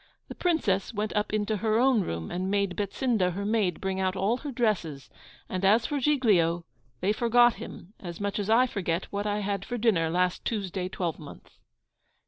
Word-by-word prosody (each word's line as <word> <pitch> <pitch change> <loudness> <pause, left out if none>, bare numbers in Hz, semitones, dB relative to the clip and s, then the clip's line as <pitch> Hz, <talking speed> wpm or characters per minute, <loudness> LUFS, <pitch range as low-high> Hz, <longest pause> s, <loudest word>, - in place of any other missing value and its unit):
The - - -5
Princess 230 - 0
went 210 +1 -2
up 210 0 0
into 215 0 0
her 220 +1 +1
own 250 -2 +4
room, 85 - -4
and 185 +2 -2
made 200 -2 0
Betsinda, 205 -2 0
her 200 +3 -4
maid, 205 -5 +1
bring 190 0 -2
out 185 0 0
all 200 +6 +1
her 285 +2 -6
dresses; 175 - -1 0.4
and 185 0 -4
as 215 +4 +4
for 290 - -1
Giglio, 205 - +2 0.4
they 200 +3 +2
forgot 240 +1 +4
him 190 - -9
as 170 -3 -7
much 200 0 -2
as 205 0 -3
I 235 +3 +5
forget 185 -7 -2
what 205 +1 -2
I 205 0 -1
had 200 -1 -2
for 245 - -4
dinner 200 -8 +2
last 180 +1 0
Tuesday 190 -4 -2
twelve 175 -3 -3
month. 150 -2 -13
200 Hz, 190 wpm, -28 LUFS, 180-225 Hz, 0.4 s, I